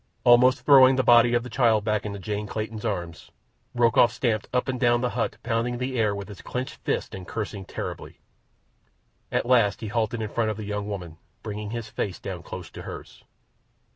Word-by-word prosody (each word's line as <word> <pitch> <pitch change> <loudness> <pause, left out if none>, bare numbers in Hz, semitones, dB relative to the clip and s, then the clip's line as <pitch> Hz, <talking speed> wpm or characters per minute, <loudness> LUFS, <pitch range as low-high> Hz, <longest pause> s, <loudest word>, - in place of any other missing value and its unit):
Almost 125 +2 +5
throwing 135 -2 +7
the 130 - +1
body 120 0 +6
of 120 - +1
the 125 - -8
child 115 -5 +3
back 105 -1 -1
into 100 -1 -5
Jane 105 +2 -4
Clayton's 110 0 -5
arms, 90 -6 -4 0.5
Rokoff 120 -1 +4
stamped 110 -3 -1
up 125 +1 0
and 130 -1 -2
down 120 -1 +3
the 125 - 0
hut, 120 -2 -2
pounding 120 +1 -1
the 130 +1 -3
air 105 -2 +2
with 100 -1 -6
his 100 -3 -10
clenched 130 +2 -5
fists - - -3
and 95 -1 -8
cursing 105 -3 -5
terribly. - - -7 1.1
At - - 0
last 120 -5 +3
he 110 - -4
halted 110 0 -1
in 105 - -4
front 115 0 0
of 105 - -3
the 110 - -6
young 105 0 -3
woman, 90 -6 -6 0.3
bringing 105 -1 -5
his 115 -1 -5
face 100 -4 -4
down 90 -3 -6
close 90 0 -8
to - - -9
hers. - - -10
110 Hz, 200 wpm, -25 LUFS, 105-120 Hz, 1.1 s, throwing